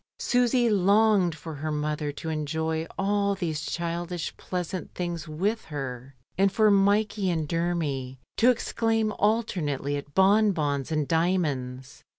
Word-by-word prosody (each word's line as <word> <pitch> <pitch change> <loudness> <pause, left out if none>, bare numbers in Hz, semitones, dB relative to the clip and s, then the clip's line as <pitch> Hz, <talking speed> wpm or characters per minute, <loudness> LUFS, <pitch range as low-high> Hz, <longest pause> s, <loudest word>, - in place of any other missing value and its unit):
Susy 245 0 +2
longed 200 -3 +3
for 160 +1 -8
her 155 +2 -4
mother 150 0 -2
to 155 +3 -6
enjoy 160 +1 -2
all 200 0 +1
these 160 -5 -3
childish 170 +1 -3
pleasant 180 0 -4
things 175 -2 -4
with 195 +9 -1
her, 135 -3 -6 0.2
and 195 0 +4
for 215 0 +4
Mikey 200 0 +2
and 160 -3 -1
Dermy 150 -6 -2 0.2
to 240 - +5
ex 245 - 0
claim 225 -1 +1
alternately 175 - 0
at 145 0 -9
bonbons 190 - +3
and 155 -2 0
diamonds. 145 -7 -1
170 Hz, 135 wpm, -26 LUFS, 150-200 Hz, 0.2 s, to